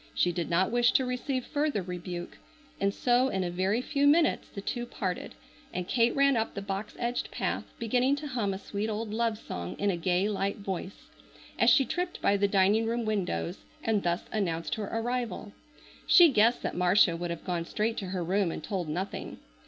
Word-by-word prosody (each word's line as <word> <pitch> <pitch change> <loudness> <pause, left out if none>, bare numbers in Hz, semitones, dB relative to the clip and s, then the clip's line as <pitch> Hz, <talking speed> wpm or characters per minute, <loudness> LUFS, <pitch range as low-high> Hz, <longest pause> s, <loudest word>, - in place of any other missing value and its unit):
She 175 - +3
did 170 -1 -3
not 185 +4 +2
wish 240 0 +3
to 260 - +3
receive 250 +1 -2
further 290 -9 -1
rebuke, 175 -1 -6 0.4
and 200 0 +2
so 245 +4 +2
in 190 -7 -1
a 175 - -2
very 190 +7 0
few 285 0 +1
minutes 315 +2 +3
the - - -8
two 240 +4 -3
parted 185 - -4 0.4
and 180 0 -4
Kate 235 -1 +2
ran 275 -1 +4
up 225 -1 -1
the 200 - -3
box 195 +1 -4
edged 240 0 -2
path, - - -2
beginning 250 +4 +2
to 295 +1 -7
hum 230 -6 -1
a 190 - -3
sweet 205 +2 -4
old 215 0 -3
love 230 -1 0
song 90 - -6
in 205 0 +1
a - - -1
gay 180 +3 +1
light 200 -1 -1
voice, 195 -1 -6 0.5
as - - +6
she 270 - +5
tripped 355 +4 -3
by 200 - +3
the 200 0 +2
dining 200 +3 +3
room 235 0 -1
windows, 195 -4 -2 0.2
and 220 -3 +1
thus 175 0 0
announced 170 -6 -1
her 210 -2 -3
arrival. 225 -3 -2 0.6
She 350 -2 +8
guessed 230 -1 +3
that - - -2
Marcia 180 0 +4
would 175 +1 -4
have 170 -1 -5
gone 175 -2 -2
straight 220 +5 -1
to 195 - -3
her 180 -1 -2
room 185 0 +1
and - - -6
told 185 -6 -3
nothing. 180 +6 -4
205 Hz, 200 wpm, -29 LUFS, 185-240 Hz, 0.6 s, She